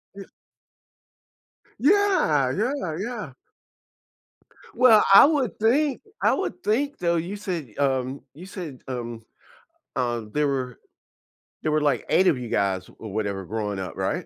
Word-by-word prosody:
Ye 200 - -8 1.6
Yeah, 290 - +3
yeah, 215 - -2
yeah. 210 - -5 1.4
Well, 230 -3 +6
I 200 - +10
would 275 - 0
think, 265 +5 +2 0.2
I - - +4
would 360 - -3
think, 280 +7 0
though, 170 -1 0
you 175 +5 -3
said, 180 - -5
um, 135 -1 0
you 170 +6 -11
said, 175 -9 -8
um 120 -3 -5 0.8
um, 120 -3 -2
there 150 0 +1
were 130 -3 -3 0.9
there 155 - 0
were, 155 0 +2
like, 145 -4 +1
8 185 0 +4
of 155 -7 +3
you 125 - -6
guys 95 -2 0
or 110 - -8
whatever 100 -2 -2
growing 105 -1 -3
up, 95 - -6
right? - - -2
155 Hz, 140 wpm, -24 LUFS, -, 1.6 s, I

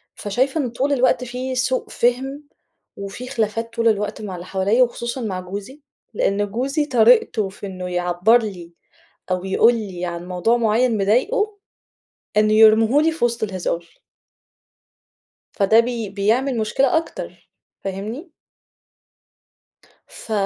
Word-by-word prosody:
فشايفة 260 +9 -1
إن 255 - -2
طول 265 +5 -1
الوقت 255 -1 +2
فيه 250 +2 -4
سوء 255 0 -1
فِهم، 265 +4 -1 0.5
وفي 200 +6 -7
خلافات 230 -2 -2
طول 230 -1 +1
الوقت 210 -1 0
مع 195 -3 -5
اللي 175 +1 -8
حواليَّا 200 +7 +2
وخصوصًا 240 +1 -3
مع 190 -5 -3
جوزي، 200 +10 -8 0.3
لإن 205 0 0
جوزي 275 +7 -1
طريقتُه 230 -5 +3
في 200 - -10
إنه 185 -1 -6
يعبّر 180 +5 +3
لي 175 -5 -7 0.6
أو 185 +1 -1
يقول 225 +5 +4
لي 190 -6 -5
عن 175 0 -6
موضوع 185 +6 +1
معيّن 230 +1 +2
مضايقُه، 405 - +1 0.8
إنه 215 0 +4
يرميه 220 +4 +6
لي 325 - +3
في 320 -6 -2
وسط 235 -1 -1
الهزار. 175 -4 -4 1.5
فده 210 +2 +4
بي 230 -3 -1
بيعمل 230 +7 0
مشكلة 250 +7 +2
أكتر 325 - -6 0.3
فاهمني؟ 215 - -6 1.8
ف 225 - -12
225 Hz, 130 wpm, -21 LUFS, 195-250 Hz, 1.8 s, يرميه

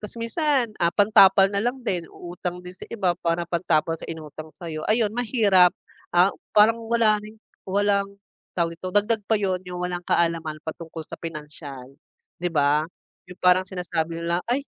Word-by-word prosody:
tas 210 +2 -9
minsan, 245 0 0
ah, 170 - +4
pantapal 195 0 +5
na 200 - 0
lang 245 +4 -1
din 175 -7 -1
uutang 180 0 -7
din 180 - -8
sa 185 - -12
iba 195 -6 0
para 170 0 0
pantapal 170 -2 0
sa - - -8
inutang 155 -1 -8
sa'yo, 160 -3 -6
ayun 215 -1 +3
mahirap, 215 -7 +3 0.3
ah, 180 +3 +4 0.2
parang 225 +2 +5
wala 225 -3 +3
ring 215 +1 -12 0.3
walang 200 0 0 0.4
tawag 170 -1 -1
dito, 185 - -4
dagdag 210 +4 +2
pa 220 - +4
'yun 190 -3 -1
'yung 180 -1 -8
walang 180 0 -3
kaalaman 165 -2 +1
patungkol 160 0 -7
sa - - -10
pinansiyal, 150 -5 -8 0.5
di 175 - 0
ba? 150 0 +1 0.4
'Yung 180 - -11
parang 180 +1 +4
sinasabi 170 -2 -3
nila 170 +1 0
ay, 265 +4 0
180 Hz, 165 wpm, -24 LUFS, 165-210 Hz, 0.5 s, pantapal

